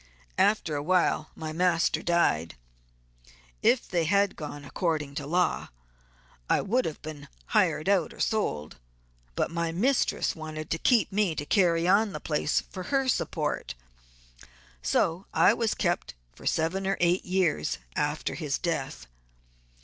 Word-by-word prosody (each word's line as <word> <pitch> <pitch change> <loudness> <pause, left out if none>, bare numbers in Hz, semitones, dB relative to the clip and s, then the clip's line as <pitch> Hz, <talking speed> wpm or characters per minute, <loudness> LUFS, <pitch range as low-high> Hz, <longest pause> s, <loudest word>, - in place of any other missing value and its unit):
After 200 -7 +2
awhile 155 +1 +1
my 155 -1 -5
master 175 0 +2
died; 125 - +1 1.1
if 250 - +3
they 170 -3 0
had 200 +3 +2
gone 145 -2 -7
according 150 -1 -2
to 145 -1 -5
law 180 +3 +1 0.8
I - - +4
would 245 +6 +1
have 155 - -4
been 155 -2 -8 0.3
hired 155 - +2
out 195 -5 +2
or - - -14
sold, 75 - -1 0.6
but - - 0
my 170 -1 -1
mistress 240 +11 +1
wanted 155 -1 -7
to 165 - 0
keep 240 +1 +3
me 195 -4 +1
to 145 - -4
carry 170 -2 +3
on 200 +2 +3
the - - -4
place 150 -1 0
for 185 -1 -9
her 270 -1 +1
support. 225 - -1 1.1
So 170 - 0
I - - +6
was 230 -2 0
kept 175 -3 -1 0.2
for - - -8
seven 185 +5 0
or 195 - +1
eight 175 +1 +2
years 180 - 0 0.2
after - - -1
his - - -2
death. - - -3
170 Hz, 140 wpm, -28 LUFS, 155-195 Hz, 1.1 s, I